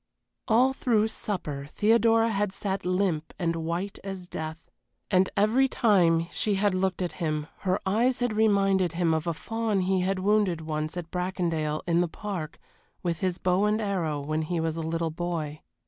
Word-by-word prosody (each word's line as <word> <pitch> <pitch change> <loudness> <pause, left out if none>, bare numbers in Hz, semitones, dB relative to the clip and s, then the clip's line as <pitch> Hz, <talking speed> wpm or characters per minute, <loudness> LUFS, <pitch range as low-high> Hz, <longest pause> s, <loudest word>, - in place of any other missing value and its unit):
All 255 +3 +4
through 225 -4 +2
supper 150 -11 -4
Theodora 225 +1 +4
had 205 -1 0
sat 195 -2 -3
limp 180 -4 0
and 170 -2 0
white 170 +5 -3
as 190 -2 -6
death, 160 -1 -5 0.5
and 185 -1 +4
every 225 +7 +4
time 175 -10 +3
she 210 -2 0
had 200 0 +2
looked 185 0 0
at 175 - -2
him 155 -2 -1
her 190 +1 0
eyes 235 +6 +2
had 245 -2 0
reminded 195 -4 +3
him 170 -1 +1
of 160 +1 -1
a 170 - +1
fawn 225 +1 -1
he 185 +1 +1
had 190 +1 0
wounded 195 -3 +2
once 155 +1 -3
at 170 -2 -6
Bracondale, 170 -4 -1
in 170 -1 +2
the 175 - +1
park, 175 -3 -5 0.5
with 170 -2 -1
his 185 -2 -1
bow 185 +2 +2
and 210 +1 +2
arrow, 180 -8 -1
when 155 +2 -2
he 165 +2 -2
was 160 -1 -1
a 165 - -3
little 165 0 -1
boy. 160 -3 -4
185 Hz, 180 wpm, -27 LUFS, 165-205 Hz, 0.5 s, All